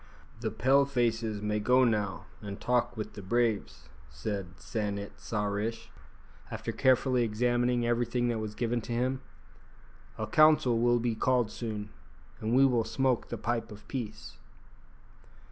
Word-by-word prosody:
"The 115 -1 -1
Pale 135 +6 +3
faces 115 -5 0
may 105 0 0
go 125 +5 +4
now 105 -6 0 0.2
and 100 -2 -6
talk 125 -1 0
with 110 - -5
the 100 - -8
braves," 105 - -1 0.2
said 90 +5 -5
San 105 -3 -2
it 100 0 -6
sa 105 -2 -2
rish, 105 +3 -3 0.6
after - - -4
carefully 130 -1 +3
examining 120 +2 +1
everything 120 +1 +1
that 115 -2 -1
was 105 -1 -5
given 120 +1 -1
to 120 - -5
him; 130 +2 0 1.0
"a - - -2
council 150 -6 +5
will 120 +1 +4
be 120 0 0
called 120 0 +1
soon, 105 -2 -5 0.5
and 110 +2 0
we 135 +1 +7
will 120 -4 +3
smoke 125 +2 0
the - - -3
pipe 115 -1 -2
of 105 0 -12
peace." 120 -6 -6
115 Hz, 150 wpm, -30 LUFS, 105-125 Hz, 1.0 s, we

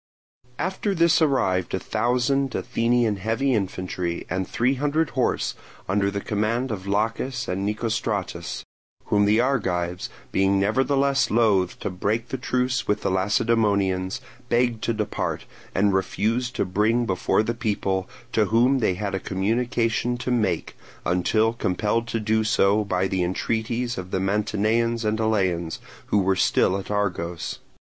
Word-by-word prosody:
After 190 +2 -1
this 170 -1 +4
arrived 95 - +1
a - - -2
thousand 125 +6 0
Athenian 120 -3 +1
heavy 115 +7 0
infantry 90 -4 -2
and 95 0 -1
three 125 +3 +1
hundred 145 +3 0
horse, - - 0 0.3
under 100 +1 +1
the 100 0 -3
command 110 +5 -1
of 100 -2 -5
Laches 115 +5 -1
and 95 +2 -2
Nicostratus; 105 -5 -2 0.4
whom 105 -1 +3
the 105 +2 +4
Argives, 90 -9 0 0.2
being 95 0 +2
nevertheless 135 +6 +2
loath 105 -6 +2
to - - -2
break 110 +6 -1
the 130 - -3
truce 125 0 0
with 105 +1 +1
the - - 0
Lacedaemonians, 100 0 +1 0.3
begged 120 -2 +1
to 115 - +1
depart, 105 -1 -2 0.3
and 100 +1 +3
refused 115 +6 0
to - - 0
bring 110 +6 +1
before 95 +1 +1
the 115 - -1
people, 100 -5 -1 0.2
to 110 -3 +3
whom 120 +6 +3
they 100 -6 +1
had 100 +1 -3
a 95 - 0
communication 115 +4 0
to 125 0 -3
make, 115 -4 0 0.3
until 110 +6 +2
compelled 110 +2 0
to 115 - -2
do 110 0 +1
so 105 -1 +3
by 95 -2 0
the 95 -1 -1
entreaties 115 +6 -1
of 90 0 -7
the 95 - -1
Mantineans 110 +4 0
and 110 +1 0
Eleans, 95 -7 0 0.3
who - - +2
were 95 -1 +3
still 95 0 +3
at 95 - -9
Argos. 90 -5 -2
110 Hz, 145 wpm, -24 LUFS, 95-120 Hz, 0.4 s, this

